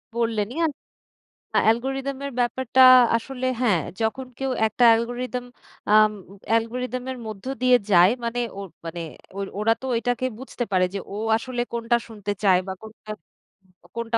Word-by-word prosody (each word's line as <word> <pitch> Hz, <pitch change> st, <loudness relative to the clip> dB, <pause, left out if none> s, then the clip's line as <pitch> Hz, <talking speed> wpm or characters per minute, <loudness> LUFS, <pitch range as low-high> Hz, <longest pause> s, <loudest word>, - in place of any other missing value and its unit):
বললেনই 230 Hz, +1 st, -1 dB
অ্যা 330 Hz, -, +3 dB, 0.9 s
আ -, -, +7 dB
algorithm 270 Hz, +4 st, 0 dB
এর 280 Hz, -, -4 dB
ব্যাপারটা 255 Hz, +1 st, +1 dB, 0.4 s
আসলে 255 Hz, +2 st, -6 dB, 0.2 s
হ্যাঁ, 205 Hz, -9 st, +3 dB, 0.2 s
যখন 225 Hz, +4 st, -1 dB
কেউ 270 Hz, -1 st, -2 dB, 0.2 s
একটা 220 Hz, +3 st, 0 dB
অ্যালগোরিদম 245 Hz, +2 st, 0 dB, 0.5 s
আম 215 Hz, 0 st, +6 dB, 0.4 s
অ্যালগরিদমের 250 Hz, +3 st, -1 dB
মধ্য 215 Hz, -1 st, -8 dB, 0.2 s
দিয়ে 250 Hz, 0 st, +6 dB
যায় 180 Hz, +2 st, +7 dB
মানে 235 Hz, +1 st, -2 dB, 0.2 s
ওই 200 Hz, -, -6 dB, 0.2 s
মানে 170 Hz, +1 st, -5 dB, 0.4 s
ওইর 200 Hz, -, -3 dB
ওরা 225 Hz, +2 st, +3 dB
তো 265 Hz, -, -6 dB
ওইটাকে 245 Hz, +2 st, -1 dB
বুঝতে 260 Hz, -1 st, -5 dB
পারে 185 Hz, -1 st, +3 dB
যে -, -, -2 dB, 0.2 s
ও -, -, -5 dB, 0.2 s
আসলে 245 Hz, 0 st, -4 dB
কোনটা 235 Hz, +1 st, +1 dB
শুনতে 210 Hz, -3 st, -5 dB
চায় 185 Hz, -3 st, +5 dB
বা 190 Hz, -, -3 dB
কোনটা, 220 Hz, -1 st, -11 dB, 0.8 s
কোনটা 235 Hz, 0 st, -1 dB
235 Hz, 150 wpm, -24 LUFS, 215-250 Hz, 0.9 s, আ